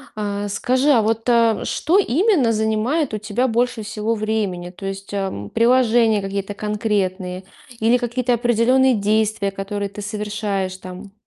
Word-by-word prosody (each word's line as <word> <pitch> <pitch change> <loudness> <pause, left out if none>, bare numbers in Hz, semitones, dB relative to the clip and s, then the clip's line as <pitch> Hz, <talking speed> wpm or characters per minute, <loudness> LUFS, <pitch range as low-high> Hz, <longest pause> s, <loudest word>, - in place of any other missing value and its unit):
А, 205 -1 -3
скажи, 255 +7 +1
а 235 - +5
вот, 225 +1 0
а, 230 -2 +3
что 360 +5 +2
именно 340 - +2
занимает 220 +7 0
у 215 - -2
тебя 215 +5 -1
больше 240 -1 0
всего 215 +2 -2
времени? 210 -5 -2
То 195 +1 -8
есть, 195 0 -6
а, 190 - -3
приложения 230 -3 +3
какие-то 195 +1 -4
конкретные 195 -3 -2 0.4
или 230 +3 +3
какие-то 245 0 -1
определенные 240 +2 +3
действия, 210 0 0
которые 200 +1 -4
ты 200 +1 -9
совершаешь 205 -2 -3
там? 185 +2 -10
215 Hz, 145 wpm, -20 LUFS, 200-235 Hz, 0.4 s, а